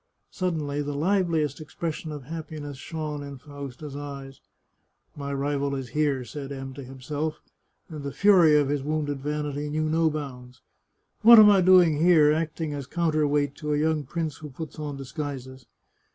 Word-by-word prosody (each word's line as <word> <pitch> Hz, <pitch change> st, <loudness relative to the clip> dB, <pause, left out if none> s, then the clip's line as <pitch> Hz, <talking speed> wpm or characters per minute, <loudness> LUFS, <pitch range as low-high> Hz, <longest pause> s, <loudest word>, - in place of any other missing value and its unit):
Suddenly 155 Hz, -6 st, -2 dB
the 145 Hz, 0 st, -4 dB
liveliest 165 Hz, -2 st, +1 dB
expression 155 Hz, +1 st, -5 dB
of 145 Hz, -3 st, -7 dB
happiness 155 Hz, -1 st, -7 dB
shone 150 Hz, 0 st, -5 dB
in 140 Hz, -1 st, -8 dB
Fausta's 140 Hz, 0 st, -9 dB
eyes, 140 Hz, -2 st, -8 dB, 0.4 s
" -, -, -46 dB, 0.3 s
My 140 Hz, -1 st, -5 dB
rival 140 Hz, 0 st, -1 dB
is 135 Hz, -2 st, -5 dB
here," 140 Hz, -2 st, 0 dB
said 140 Hz, +2 st, -7 dB
M 135 Hz, -1 st, -6 dB
to 140 Hz, +1 st, -8 dB
himself, 145 Hz, +4 st, -4 dB, 0.5 s
and 155 Hz, -3 st, -8 dB
the 140 Hz, -, -4 dB
fury 180 Hz, -4 st, +5 dB
of 145 Hz, -, +1 dB
his 145 Hz, -1 st, 0 dB
wounded 145 Hz, -1 st, -2 dB
vanity 150 Hz, 0 st, -3 dB
knew 155 Hz, +1 st, -1 dB
no 160 Hz, +1 st, +2 dB
bounds. 130 Hz, -5 st, -7 dB, 0.3 s
" -, -, -48 dB
What 235 Hz, +2 st, +10 dB
am 210 Hz, -1 st, +9 dB
I 195 Hz, -2 st, +5 dB
doing 180 Hz, -4 st, +6 dB
here, 160 Hz, -4 st, +6 dB
acting 160 Hz, -1 st, -2 dB
as 140 Hz, -3 st, -5 dB
counter 155 Hz, -2 st, +1 dB
weight 145 Hz, -1 st, +1 dB
to 150 Hz, -2 st, -1 dB
a -, -, 0 dB
young 155 Hz, -1 st, +1 dB
prince 155 Hz, +1 st, -4 dB
who 155 Hz, -2 st, -9 dB
puts 155 Hz, +3 st, -8 dB
on 145 Hz, -2 st, -4 dB
disguises 130 Hz, -2 st, -6 dB
150 Hz, 175 wpm, -26 LUFS, 140-160 Hz, 0.5 s, What